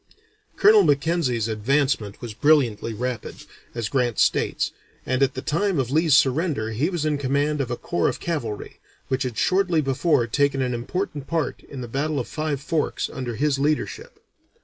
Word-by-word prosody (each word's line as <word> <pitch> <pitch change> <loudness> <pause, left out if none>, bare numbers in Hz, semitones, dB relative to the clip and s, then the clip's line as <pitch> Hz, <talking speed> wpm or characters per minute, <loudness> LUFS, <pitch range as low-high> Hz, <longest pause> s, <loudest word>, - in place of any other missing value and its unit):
Colonel 210 +1 +6
Mackenzie's 145 - +1
advancement 115 -1 0
was 120 -3 -6
brilliantly 120 -4 +2
rapid, 125 +2 -5 0.3
as 115 -3 -2
Grant 120 -3 0
states, - - +1 0.3
and 130 +1 0
at 135 -1 +2
the 130 - -5
time 190 +3 0
of 130 -2 -1
Lee's 155 -1 +4
surrender 130 -4 +1
he 130 +10 0
was 175 -5 -2
in 150 -2 0
command 145 +2 0
of 130 - -3
a 120 - -2
corps 85 - 0
of - - -5
cavalry, 125 -11 -4 0.3
which 130 0 0
had 125 -4 -3
shortly 185 -3 +2
before 135 -1 +2
taken 140 +3 +1
an 125 -1 0
important 145 +4 -4
part 165 -5 -2
in 135 -3 -7
the 120 - -5
battle 140 +4 -1
of 125 - -4
Five 155 -3 -2
Forks 155 +2 -2
under 125 -3 -4
his 140 +1 +1
leadership. 150 +2 -2
140 Hz, 170 wpm, -23 LUFS, 120-155 Hz, 0.3 s, Colonel